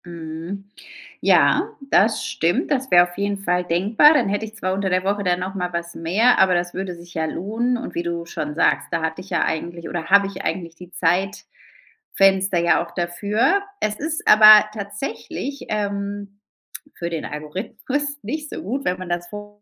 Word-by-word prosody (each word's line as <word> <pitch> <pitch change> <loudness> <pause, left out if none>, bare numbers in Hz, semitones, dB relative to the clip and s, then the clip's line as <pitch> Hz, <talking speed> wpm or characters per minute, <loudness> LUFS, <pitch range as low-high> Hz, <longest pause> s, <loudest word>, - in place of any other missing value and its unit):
Mhm, 170 +3 -7 0.6
ja, - - +4 0.2
das 220 +3 +3
stimmt. 170 - -1
Das 265 -1 0
wäre 175 0 +7
auf 175 - -14
jeden 200 0 -1
Fall 180 -2 0
denkbar. 200 - +4
Dann 295 - +2
hätte 205 +2 -1
ich 220 0 -12
zwar 185 -3 -2
unter 195 0 -1
der 185 0 +1
Woche 200 +1 -1
dann 180 -1 +1
noch 185 +1 -4
mal 180 -2 -3
was 170 0 -4
mehr, 200 +10 +2
aber 190 -1 +4
das 175 0 -1
würde 185 -1 -4
sich 170 0 -14
ja 160 - -1
lohnen. 225 +9 -2
Und 250 - -7
wie 170 - -2
du 170 -1 -4
schon 150 -3 -5
sagst, - - +2
da 165 -1 -1
hatte 160 +2 -3
ich 185 - -13
ja - - +1
eigentlich 170 +1 -4
oder 170 -2 -4
habe 200 +1 +5
ich 195 -1 -8
eigentlich 165 0 -3
die 180 +1 -13
Zeitfenster 195 - -1
ja 170 0 +3
auch 170 - -15
dafür. 205 - +1 0.2
Es 210 0 -2
ist 315 +2 -4
aber 215 0 +9
tatsächlich, 220 +6 -6
ähm, 200 -1 -4 0.6
für 170 - -4
den 165 -2 -4
Algorithmus 230 - -4
nicht 305 0 -4
so - - -6
gut, 265 +8 -3
wenn 180 0 0
man 185 - -7
das 175 0 -2
vor 205 +1 -10
190 Hz, 190 wpm, -21 LUFS, 175-210 Hz, 0.6 s, aber